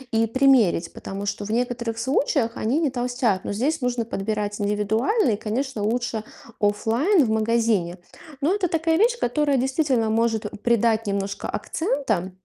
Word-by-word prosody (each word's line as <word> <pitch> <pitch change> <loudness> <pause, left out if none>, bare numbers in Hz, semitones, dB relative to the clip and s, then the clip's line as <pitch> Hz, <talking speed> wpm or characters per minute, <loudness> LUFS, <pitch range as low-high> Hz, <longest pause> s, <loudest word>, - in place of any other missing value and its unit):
и 225 0 +3
примерить, 245 -9 +3
потому 195 +1 -6
что 205 0 -3
в 215 - -5
некоторых 235 -1 -1
случаях 245 -1 0
они 250 +8 0
не 305 -4 +1
толстят, 245 -5 -1
но - - -2
здесь 280 +7 -1
нужно 245 -2 -1
подбирать 210 -1 -3
индивидуально 220 - +1
и, 205 - 0
конечно, 225 +1 -3
лучше 230 0 -1 0.4
оффлайн 230 - +2
в 220 - -2
магазине. 220 -5 +1 0.4
Но 325 +7 +2
это 380 -3 0
такая 325 0 +1
вещь, 470 +5 +2
которая 280 +2 +1
действительно 260 -3 +1
может 225 -2 0
придать 230 -2 +2
немножко 200 0 -3
акцента. 230 - -2
230 Hz, 150 wpm, -23 LUFS, 210-270 Hz, 0.4 s, и